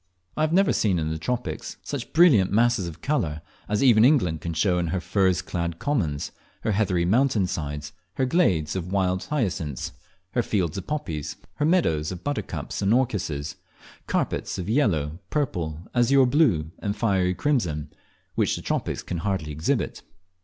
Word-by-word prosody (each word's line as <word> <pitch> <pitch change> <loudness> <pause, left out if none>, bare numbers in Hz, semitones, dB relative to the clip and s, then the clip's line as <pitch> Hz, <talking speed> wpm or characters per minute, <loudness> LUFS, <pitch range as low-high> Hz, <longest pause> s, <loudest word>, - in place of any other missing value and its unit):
I - - -1
have 155 0 +2
never 195 +3 +4
seen 100 -5 +2
in 80 -1 -1
the 80 - -3
tropics 125 +8 -3
such 140 -4 -5
brilliant 150 - +5
masses 115 -3 +3
of 80 - -9
colour 80 - -1 0.3
as 105 +4 +1
even 115 -5 +6
England 105 - +3
can 85 -1 -4
show 90 +2 +2
in 85 - -1
her 90 +4 -1
furze 95 0 +1
clad 85 -2 -3
commons, 85 - -1 0.3
her - - 0
heathery 95 -4 +1
mountain 115 +1 +3
sides, 75 -4 -4 0.2
her 130 - +1
glades 95 - +2
of 90 -1 -4
wild 95 -1 +1
hyacinths, 95 - -2 0.4
her 120 - +1
fields 90 -8 -1
of 95 - -5
poppies, 80 - -3 0.2
her 150 - +1
meadows 90 - +2
of 90 -1 -7
buttercups 145 -6 -3
and 100 +1 +2
orchises 85 - -1 0.5
carpets - - -1
of 90 - -4
yellow, 85 - +1
purple, 90 - -1 0.2
azure 130 +2 +5
blue, 120 - +2
and 100 -1 -2
fiery 95 -5 +1
crimson, 85 - -1 0.4
which - - +1
the - - -7
tropics - - -2
can 85 - -4
rarely 85 -4 -2
exhibit. 75 +2 -1
95 Hz, 165 wpm, -25 LUFS, 80-125 Hz, 0.5 s, even